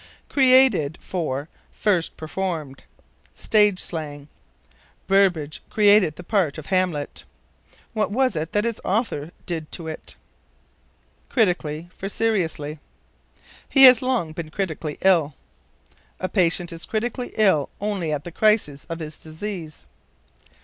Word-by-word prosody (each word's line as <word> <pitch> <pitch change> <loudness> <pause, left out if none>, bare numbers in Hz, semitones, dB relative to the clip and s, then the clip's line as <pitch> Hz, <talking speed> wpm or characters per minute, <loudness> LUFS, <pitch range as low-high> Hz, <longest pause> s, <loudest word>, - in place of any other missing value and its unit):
Created 255 - +4
for 150 -6 -3 0.2
First 185 -6 0
Performed. 155 -4 -4 0.5
Stage 210 -3 +3
slang. 145 -3 -4 0.8
"Burbage 175 -7 +2
created 205 -6 +4
the 180 - -10
part 180 -6 0
of 155 - -8
Hamlet." 185 -6 -1 0.7
What 215 -2 0
was 255 0 +1
it 160 +1 -3
that 210 +2 +1
its 230 -2 -3
author 190 - -1 0.2
did 160 -4 -5
to 165 -3 -5
it? 160 - -8 1.1
Critically 175 - 0
for 195 - -5
Seriously. 165 -9 -1 0.9
"He 270 - +6
has 255 -3 +10
long 250 -11 -1
been 160 -1 -6
critically 160 -4 -4
ill." 165 -7 +3 0.8
A 185 - -2
patient 175 -2 +1
is 165 - -9
critically 240 +3 -3
ill 190 -10 +3
only 195 -6 -2
at 150 -1 -2
the 175 - -8
crisis 205 -8 +1
of 165 - -4
his 155 -2 -7
disease. 160 -1 -7
175 Hz, 120 wpm, -23 LUFS, 155-210 Hz, 1.1 s, has